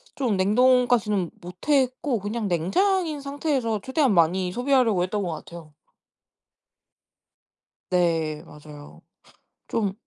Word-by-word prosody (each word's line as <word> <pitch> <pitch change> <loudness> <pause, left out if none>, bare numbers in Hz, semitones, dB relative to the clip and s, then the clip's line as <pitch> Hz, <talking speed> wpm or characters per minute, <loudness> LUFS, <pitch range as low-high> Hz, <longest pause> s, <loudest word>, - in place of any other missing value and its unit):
좀 240 -8 0
냉동까지는 220 -2 +2
못했고 255 - -1
그냥 210 +2 -3
냉장인 310 - 0
상태에서 275 -6 -2
최대한 260 -3 +1
많이 180 +1 +2
소비하려고 245 -4 +2
했던 205 +3 -2
것 175 -3 -3
같아요. 160 -1 -11 2.2
네. 165 -3 0
맞아요. 150 -2 -13 0.7
좀 210 -4 -1
210 Hz, 235 characters per minute, -24 LUFS, 175-260 Hz, 2.2 s, 냉동까지는